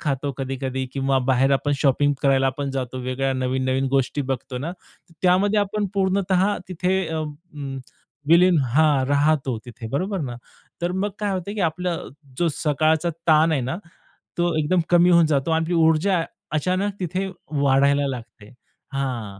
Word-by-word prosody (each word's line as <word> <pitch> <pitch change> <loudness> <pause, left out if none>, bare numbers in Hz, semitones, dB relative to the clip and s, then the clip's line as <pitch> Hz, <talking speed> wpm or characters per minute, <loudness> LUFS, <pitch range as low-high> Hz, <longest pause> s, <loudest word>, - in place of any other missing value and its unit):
खातो 140 -2 -1
कधी-कधी 130 0 -3
किंवा 135 -1 +1
बाहेर 135 +1 +3
आपण 145 +2 +1
शॉपिंग 145 +1 +2
करायला 135 -1 +3
पण 140 -1 -2
जातो. 130 -1 -4
वेगळ्या 130 +2 -1
नवीन-नवीन 130 +1 0
गोष्टी 135 +1 0
बघतो 130 0 -3
ना, 155 +7 -4 0.5
त्यामध्ये 190 +3 +3
आपण 205 +1 -1
पूर्णतः 190 0 +1
तिथे 185 +1 0
अं, 155 -2 -3 0.4
अ, - - -4 0.5
विलीन 175 0 +6 0.2
हां, 150 -4 +4
राहतो 145 -4 +1
तिथे 120 -1 -8
बरोबर 185 - -2
ना, 125 -4 -4 0.5
तर 175 +1 0
मग 200 +2 -1
काय 210 -1 -1
होतं, 190 +2 -3
की 210 - -3
आपलं 180 +2 0
अ, - - -8 0.3
जो 170 -1 +2
सकाळचा 155 +2 +1 0.2
ताण 160 +1 +5
आहे 140 - +1
ना, 130 +8 -3 0.6
तो 175 0 +1
एकदम 170 +4 +2
कमी 175 0 +5
होऊन 170 -1 +6
जातो 145 +1 0
आणि 160 0 +2
आपली 175 - -1
ऊर्जा 165 +2 +3 0.3
अचानक 185 +6 0
तिथे 185 +2 -2 0.2
वाढायला 140 0 +3
लागते. 115 -4 -8 0.4
हां. 120 -8 -3
150 Hz, 160 wpm, -23 LUFS, 135-180 Hz, 0.6 s, विलीन